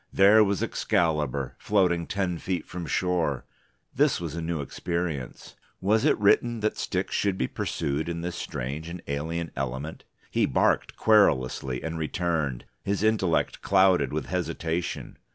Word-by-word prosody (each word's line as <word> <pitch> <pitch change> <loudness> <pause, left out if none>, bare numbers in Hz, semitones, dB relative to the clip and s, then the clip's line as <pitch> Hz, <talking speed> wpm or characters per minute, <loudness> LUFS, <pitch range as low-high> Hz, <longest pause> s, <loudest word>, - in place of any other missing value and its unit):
There 105 +3 +6
was 100 -2 0
Excalibur, 75 -6 0
floating 90 -5 +2
ten 95 -4 -1
feet 90 -4 -2
from 85 -2 -6
shore. 85 -8 0 0.5
This - - +3
was 85 -3 -5
a 85 - -4
new 80 -1 -2
experience. 80 -2 -4 0.2
Was 105 +3 +2
it - - +4
written 115 +2 +3
that 110 - 0
sticks - - -2
should 100 -2 +1
be 65 - 0
pursued 75 +4 -2
in 85 0 -3
this 90 0 -4
strange 75 +1 -4
and 85 0 -7
alien 80 +3 -3
element? 70 +4 -4 0.3
He - - +2
barked - - +1
querulously, 65 - +2
and 80 0 -3
returned, 80 -5 -1 0.2
his 100 +1 -1
intellect 105 -6 +1
clouded 95 -8 +4
with 80 +1 -2
hesitation. 85 -1 -3
85 Hz, 145 wpm, -27 LUFS, 75-95 Hz, 0.5 s, There